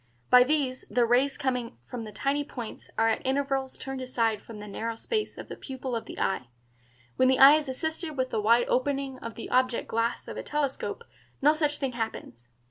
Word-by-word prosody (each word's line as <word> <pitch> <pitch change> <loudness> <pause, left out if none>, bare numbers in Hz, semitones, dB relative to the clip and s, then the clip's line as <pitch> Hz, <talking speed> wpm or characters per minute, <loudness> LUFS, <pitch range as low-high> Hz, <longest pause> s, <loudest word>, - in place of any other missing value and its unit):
By 250 0 +9
these 265 -2 0
the 245 -1 +3
rays 255 +4 +2
coming 250 - -2
from 230 - -6
the 215 - -8
tiny 280 +7 0
points 240 -6 -8
are 225 - +4
at 220 - 0
intervals 270 0 -1
turned 270 -1 -5
aside 230 -4 0
from 225 - -10
the 210 0 -8
narrow 225 +3 -3
space 430 - -2
of - - -8
the - - -7
pupil 260 -2 -5
of 230 - -3
the - - -8
eye. 125 -10 0 0.7
When 255 - +5
the 260 0 +4
eye 270 +2 +10
is 305 -3 -4
assisted 315 +3 -3
with 260 0 0
the 220 - 0
wide 235 +3 +4
opening 270 0 0
of 230 - -7
the 230 - -7
object 255 -1 +2
glass 230 +1 -1
of - - -6
a - - -2
telescope 295 - -2 0.4
no 295 +2 +5
such 300 -1 0
thing 270 -2 -2
happens. 220 - -5
255 Hz, 210 wpm, -28 LUFS, 230-275 Hz, 0.7 s, eye